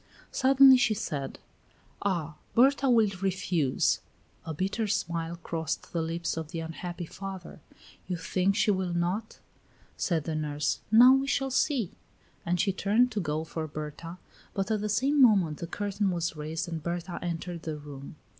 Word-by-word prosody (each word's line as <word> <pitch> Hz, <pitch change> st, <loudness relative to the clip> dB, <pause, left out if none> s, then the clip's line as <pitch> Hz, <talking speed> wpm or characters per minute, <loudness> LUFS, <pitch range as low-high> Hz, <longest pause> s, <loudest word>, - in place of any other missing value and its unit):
Suddenly 265 Hz, 0 st, +7 dB
she 225 Hz, -3 st, +2 dB
said: 140 Hz, -8 st, -4 dB, 0.6 s
"Ah! 170 Hz, -6 st, -1 dB, 0.2 s
Berta 270 Hz, +2 st, +4 dB
will 225 Hz, -4 st, +4 dB
refuse." 180 Hz, -7 st, +1 dB, 0.5 s
A -, -, -2 dB
bitter 195 Hz, +7 st, -1 dB
smile 170 Hz, -4 st, -2 dB
crossed 165 Hz, -2 st, -4 dB
the 170 Hz, -, 0 dB
lips 165 Hz, +1 st, -2 dB
of 160 Hz, -2 st, -4 dB
the 165 Hz, 0 st, -4 dB
unhappy 170 Hz, +2 st, -5 dB
father. 190 Hz, 0 st, -8 dB, 0.5 s
"You 180 Hz, -1 st, -2 dB
think 185 Hz, +3 st, 0 dB
she 210 Hz, -, +3 dB
will 185 Hz, -3 st, -1 dB
not?" 185 Hz, +6 st, -2 dB, 0.6 s
said 165 Hz, -5 st, 0 dB
the 160 Hz, -, -3 dB
nurse. 150 Hz, -1 st, -1 dB
"Now, 245 Hz, +4 st, +9 dB
we 270 Hz, +1 st, +2 dB
shall 270 Hz, -1 st, 0 dB
see." 260 Hz, -, +1 dB, 0.6 s
And 175 Hz, +1 st, +1 dB
she 195 Hz, +2 st, +2 dB
turned 215 Hz, +6 st, +2 dB
to 215 Hz, -, -2 dB
go 155 Hz, -3 st, -2 dB
for 160 Hz, 0 st, -5 dB
Berta, 155 Hz, +3 st, -7 dB, 0.4 s
but 195 Hz, +2 st, -1 dB
at 215 Hz, -2 st, +1 dB
the 210 Hz, -, -2 dB
same 275 Hz, +7 st, +2 dB
moment 195 Hz, -, +4 dB
the 170 Hz, -, -5 dB
curtain 205 Hz, +2 st, -1 dB
was 170 Hz, -2 st, -2 dB
raised 155 Hz, +3 st, -4 dB
and 165 Hz, -2 st, -4 dB
Berta 175 Hz, +2 st, -4 dB
entered 175 Hz, 0 st, -4 dB
the 155 Hz, -2 st, -4 dB
room. 145 Hz, -1 st, -10 dB
175 Hz, 165 wpm, -28 LUFS, 160-210 Hz, 0.6 s, Now